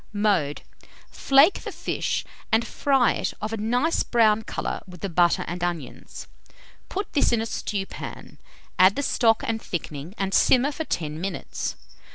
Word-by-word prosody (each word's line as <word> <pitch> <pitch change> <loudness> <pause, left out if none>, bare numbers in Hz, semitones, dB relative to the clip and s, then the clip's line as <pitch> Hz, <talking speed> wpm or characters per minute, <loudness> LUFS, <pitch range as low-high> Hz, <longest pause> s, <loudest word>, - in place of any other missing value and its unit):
Mode. 200 -9 +1 0.5
Flake 275 +8 +4
the - - -6
fish, - - -2 0.3
and 225 +1 +3
fry 270 -1 +2
it - - -3
of 215 +1 -4
a - - -2
nice 245 +9 +1
brown 220 -2 +3
colour - - -4
with 180 -2 -12
the 195 - -2
butter 175 0 +2
and 175 +1 -4
onions; 175 -2 -5 0.6
put 400 +2 -4
this 285 - +3
in 235 - +2
a 225 - -1
stewpan, 200 -3 -5 0.4
add 185 +2 +7
the 285 - -1
stock 225 -4 +2
and 225 -1 -2
thickening, 160 +1 -6
and 195 -1 -2
simmer 260 +7 +4
for 320 +2 -5
10 155 - -3
minutes. 190 -1 -4
215 Hz, 160 wpm, -25 LUFS, 180-240 Hz, 0.6 s, add